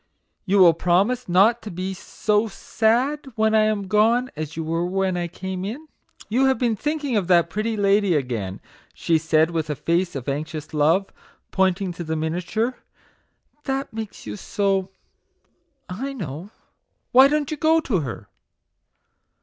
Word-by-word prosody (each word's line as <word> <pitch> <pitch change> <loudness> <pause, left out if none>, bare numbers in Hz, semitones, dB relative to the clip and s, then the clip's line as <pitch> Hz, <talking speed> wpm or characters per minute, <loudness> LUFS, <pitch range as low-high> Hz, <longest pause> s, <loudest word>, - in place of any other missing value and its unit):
You 200 0 +2
will 180 -3 +7
promise 190 +9 +1
not 205 +7 +4
to 215 - -7
be 185 +2 -4
so 210 +3 -1
sad 245 +8 0
when 220 0 +2
I 215 -1 +4
am 210 -2 -1
gone 230 +5 +2
as 155 +1 -6
you 165 - -2
were 165 +2 -1
when 190 +1 0
I 175 -1 -2
came 185 +1 -6
in. 255 +11 -6 0.4
You 250 +6 +2
have 265 -2 +3
been 235 -2 +1
thinking 295 0 -2
of 195 -5 0
that 175 -2 +3
pretty 215 +2 -2
lady 200 -2 +3
again! 115 -9 -3 0.2
'' - - -30
she 165 -1 +1
said, 160 +1 +2
with 160 -2 -2
a 150 - -1
face 170 +4 -1
of 130 -3 -6
anxious 155 +2 -4
love 160 +6 +2 0.4
pointing 190 -1 +1
to 175 - -6
the 160 0 -3
miniature 180 +10 -2 0.9
"that 270 -2 -3
makes 220 -2 -7
you 105 -1 -5
so, 195 - -1 1.0
I 255 +10 -5
know! 175 - -6 0.6
Why 260 +2 +8
don't 295 0 -1
you 310 - -3
go 320 +2 +3
to 220 - 0
her 120 -10 -6
190 Hz, 165 wpm, -23 LUFS, 165-225 Hz, 1.0 s, Why